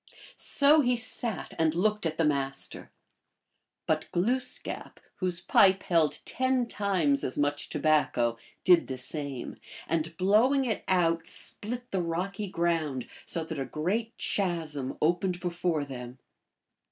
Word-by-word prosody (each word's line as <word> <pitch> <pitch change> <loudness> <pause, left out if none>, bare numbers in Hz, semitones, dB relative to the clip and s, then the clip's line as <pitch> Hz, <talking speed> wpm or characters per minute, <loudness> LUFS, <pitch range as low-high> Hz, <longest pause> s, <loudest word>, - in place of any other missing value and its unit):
So 295 +2 +4
he 250 -2 +2
sat 235 -2 -2
and 160 0 +2
looked 210 0 +1
at 160 0 -4
the 165 - +2
Master. 135 -2 -2 1.0
But - - -1
Gloos 250 +8 0
kap, - - -7 0.2
whose 180 -2 -2
pipe 190 +1 +5
held 165 -4 +2
ten 260 -1 +1
times 185 -11 +1
as 130 - -2
much 145 0 0
tobacco, 145 -6 +2 0.2
did 180 -3 +5
the 130 - -4
same, 135 -1 -3 0.3
and 165 0 -1
blowing 230 +9 +4
it 220 -4 -1
out 165 -3 +2
split 245 +7 -5
the 190 - 0
rocky 185 +5 -2
ground, 165 -7 -1 0.2
so 165 - 0
that 160 -2 -5
a 135 - -1
great 195 - -2
chasm 160 -8 -1
opened 175 +2 +1
before 175 -3 -1
them. 125 -2 -8
170 Hz, 135 wpm, -29 LUFS, 150-205 Hz, 1.0 s, pipe